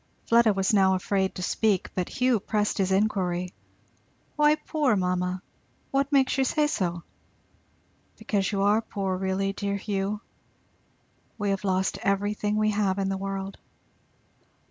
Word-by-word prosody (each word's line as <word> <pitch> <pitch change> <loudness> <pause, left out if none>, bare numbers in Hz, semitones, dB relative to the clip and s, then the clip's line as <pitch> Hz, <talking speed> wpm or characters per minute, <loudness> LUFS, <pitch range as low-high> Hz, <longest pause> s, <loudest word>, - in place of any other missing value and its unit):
Fleda 230 -1 +5
was 195 +1 0
now 190 -2 +4
afraid 190 +1 -1
to 180 - -5
speak, 205 0 0
but 180 -1 -2
Hugh 250 -3 +2
pressed 210 +1 -1
his 190 -1 +1
inquiry. 185 -3 0 0.8
"Why 300 0 +4
'poor' 300 -6 0
mamma? 180 0 -1 0.5
what 275 +1 +1
makes 270 -1 +3
you - - +4
say 300 +3 +2
so?" 175 - -2 1.1
"Because 210 -3 -1
you 195 -1 0
are 210 +2 +4
poor 195 -4 -3
really, 190 +1 -1
dear 200 0 -2
Hugh. 200 0 -2 1.2
We 205 -2 0
have 195 0 -2
lost 190 -1 0
everything 205 +1 0
we 215 0 +2
have 200 -2 0
in 195 -1 0
the 195 - -1
world." 195 0 -5
200 Hz, 145 wpm, -26 LUFS, 190-215 Hz, 1.2 s, Fleda